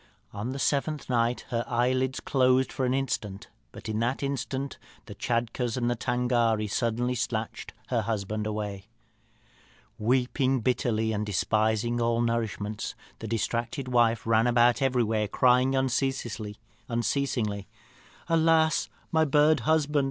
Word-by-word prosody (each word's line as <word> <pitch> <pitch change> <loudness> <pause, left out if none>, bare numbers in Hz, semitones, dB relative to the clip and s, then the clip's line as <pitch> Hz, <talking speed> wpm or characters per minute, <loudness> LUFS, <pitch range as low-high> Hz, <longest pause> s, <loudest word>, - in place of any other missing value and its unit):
On 105 +4 -4
the 135 - -4
seventh 145 0 -1
night 120 0 +1
her 120 -1 -1
eyelids 130 +2 +1
closed 130 -1 +2
for 130 - 0
an 125 - +1
instant, 110 -7 -3 0.2
but - - -10
in 110 0 -2
that 120 +5 -1
instant 140 0 -3 0.3
the - - -9
Tschadkurrs 120 0 -1
and 120 -1 0
Tângâri 120 -3 +1
suddenly 120 +1 0
snatched 115 -2 -3 0.2
her 120 -3 +1
husband 105 0 -2
away. 105 -2 -4 1.1
"Weeping 130 +3 +1
bitterly, 110 -2 0
and 105 -1 -1
despising 110 +4 0
all 115 0 +1
nourishment, 110 -3 -2 0.2
the 110 - -6
distracted 115 +4 -2
wife 115 -4 +2
ran 115 +1 +3
about 120 +1 +4
everywhere, 115 -5 +1
crying 125 +4 +3
unceasingly, 130 -5 -1 1.7
'Alas, 160 -1 +3 0.2
my 160 -1 +4
bird 150 +1 +4
husband! 150 -2 +2
120 Hz, 120 wpm, -27 LUFS, 110-130 Hz, 1.7 s, about